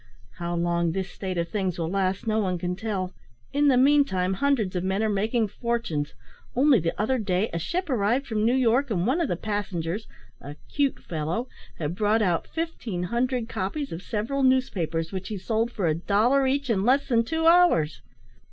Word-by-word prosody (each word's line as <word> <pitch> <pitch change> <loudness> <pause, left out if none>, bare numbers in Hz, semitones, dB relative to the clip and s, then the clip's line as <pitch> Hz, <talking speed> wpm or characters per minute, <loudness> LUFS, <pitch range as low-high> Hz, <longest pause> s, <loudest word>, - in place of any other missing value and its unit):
How 175 0 -2
long 170 -1 0
this 190 0 -3
state 185 -2 -4
of 170 0 -1
things 190 -4 -2
will 165 -2 -2
last 190 +2 -1
no 220 0 +1
one 185 -4 0
can 180 +1 -2
tell; 190 -3 -3 0.4
in 290 +1 +3
the 265 -3 +5
meantime, 255 -9 +3
hundreds 220 -4 0
of 180 - -1
men 190 +3 0
are 220 - +1
making 215 +2 0
fortunes. 230 - -2 0.4
Only 265 -1 +5
the 165 0 -2
other 255 +5 +1
day 200 0 0
a 170 - -1
ship 345 - -2
arrived 245 +1 +1
from 215 -4 -1
New 235 +3 +3
York, 260 +2 +2
and 185 -5 0
one 275 +9 +1
of 330 - +1
the 175 - -1
passengers, 195 -1 -3 0.3
a 145 +1 -8 0.2
`'cute' 280 -2 0
fellow, 165 +9 -3 0.3
had 155 0 -2
brought 215 +3 +2
out 175 -4 0
fifteen 245 - -4
hundred 250 -1 0
copies 225 +9 -3
of 165 - -5
several 230 +7 -2
newspapers, 180 -12 +1
which 190 -1 -5
he 210 - -4
sold 225 +4 -1
for 205 -6 -2
a 160 - +3
dollar 220 - +2
each 275 -1 0
in 195 -3 +1
less 260 +5 +3
than 230 -3 +3
two 320 +7 -2
hours! 335 - +4
210 Hz, 195 wpm, -26 LUFS, 180-255 Hz, 0.4 s, the